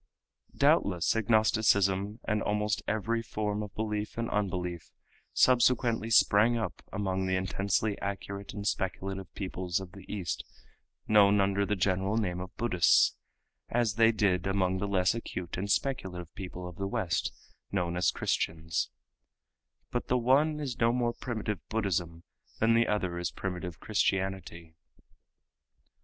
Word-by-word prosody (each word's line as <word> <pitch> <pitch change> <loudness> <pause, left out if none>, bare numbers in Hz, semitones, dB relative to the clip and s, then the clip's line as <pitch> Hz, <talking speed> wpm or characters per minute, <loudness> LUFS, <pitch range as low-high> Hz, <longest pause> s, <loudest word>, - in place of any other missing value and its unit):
Doubtless 85 +2 +3
agnosticism 105 -2 +2
and 105 0 +1
almost 105 0 0
every 115 +2 0
form 105 -2 -2
of 105 -2 -7
belief 105 -1 -3
and 115 0 -2
unbelief 90 -4 -2 0.4
subsequently 120 -3 +3
sprang 110 +1 +5
up 110 -5 -4
among 95 -2 -1
the 95 - +1
intensely 95 +3 0
acute 100 0 -5
and 100 0 -5
speculative 95 -1 -3
peoples 90 -2 -2
of 95 -2 -9
the 100 - -11
East 95 -6 -3 0.6
known 105 -1 +5
under 100 0 +2
the 105 - +1
general 95 +2 +1
name 90 -5 -1
of 90 0 -8
Buddhists, 90 -8 +4 0.5
as 115 -3 +1
they 115 +2 +5
did 100 -5 +1
among 95 -1 +1
the 100 - -2
less 95 -2 +2
acute 90 -6 -5
and 100 +3 -3
speculative 95 - -1
peoples 90 -2 -7
of - - -18
the 100 - -1
West 90 -3 -1 0.4
known 90 -3 -1
as 90 +1 +3
Christians; 80 0 -1 1.0
but 120 - -2
the 125 - +2
one 140 +6 +3
is 135 -5 -4
no 115 0 +4
more 120 -1 0
primitive 110 -6 -4
Buddhism 85 -6 -1 0.3
than 115 +1 +3
the 115 0 +4
other 95 -5 -1
is 85 -2 -1
primitive 90 -2 -5
Christianity. 95 -4 -1
100 Hz, 140 wpm, -30 LUFS, 90-110 Hz, 1.0 s, sprang